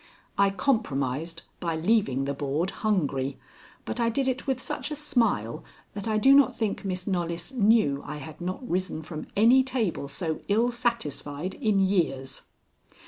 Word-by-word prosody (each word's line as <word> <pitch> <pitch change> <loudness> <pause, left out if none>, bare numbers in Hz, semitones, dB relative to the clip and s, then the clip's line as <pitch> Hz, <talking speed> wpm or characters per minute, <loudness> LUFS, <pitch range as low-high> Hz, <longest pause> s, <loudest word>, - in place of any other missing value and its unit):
I 200 0 +4
compromised 165 - -1 0.2
by 165 -2 -1
leaving 160 - +2
the 140 - -1
board 145 +6 -1
hungry, 140 -11 0 0.5
but 245 - -4
I 230 -1 +3
did 265 +3 0
it 260 +1 -2
with 265 -2 0
such - - -3
a 300 - -3
smile 225 - 0 0.3
that 200 +1 -5
I 215 -1 +1
do 265 +6 +6
not 275 -3 +5
think 220 -3 -1
Miss 185 -2 -2
Knollys 170 -3 -2
knew 210 - +3
I 150 +1 -6
had 155 +3 -9
not 185 +8 -4
risen 180 -4 -2
from 155 -1 -7
any 235 +5 +7
table 240 - -1
so 160 +3 -3
ill 230 +4 +3
satisfied 185 - -2
in 210 -3 +1
years. 170 -9 0
190 Hz, 160 wpm, -27 LUFS, 150-230 Hz, 0.5 s, any